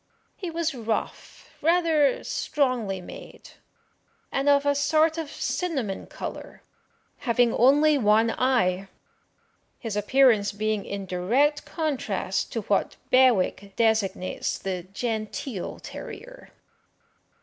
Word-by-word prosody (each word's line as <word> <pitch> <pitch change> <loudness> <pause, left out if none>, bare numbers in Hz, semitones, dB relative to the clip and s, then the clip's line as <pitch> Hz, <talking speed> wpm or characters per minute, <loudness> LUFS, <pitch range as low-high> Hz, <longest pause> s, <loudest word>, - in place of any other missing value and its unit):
He 365 - -5
was 330 -1 -1
rough, 225 -3 -4
rather 325 -3 +3
strongly 245 -10 -1
made, - - -11 0.8
and 275 +1 +1
of 285 0 +4
a 285 - +3
sort 310 +3 +2
of 315 -3 -4
cinnamon 275 - -3
colour, - - -8 0.6
having 235 -1 +2
only 290 +4 +4
one 220 0 +4
eye; 195 -8 +1 0.9
his 225 -4 -5
appearance 210 -1 +3
being 215 0 -1
in 200 -1 -5
direct 240 +12 +1
contrast 295 -4 -2
to - - -1
what - - 0 0.2
Bewick 205 -6 +3
designates 220 -5 0
the 185 -2 -4
genteel 220 0 -4
terrier. - - -10
245 Hz, 105 wpm, -26 LUFS, 205-290 Hz, 0.9 s, of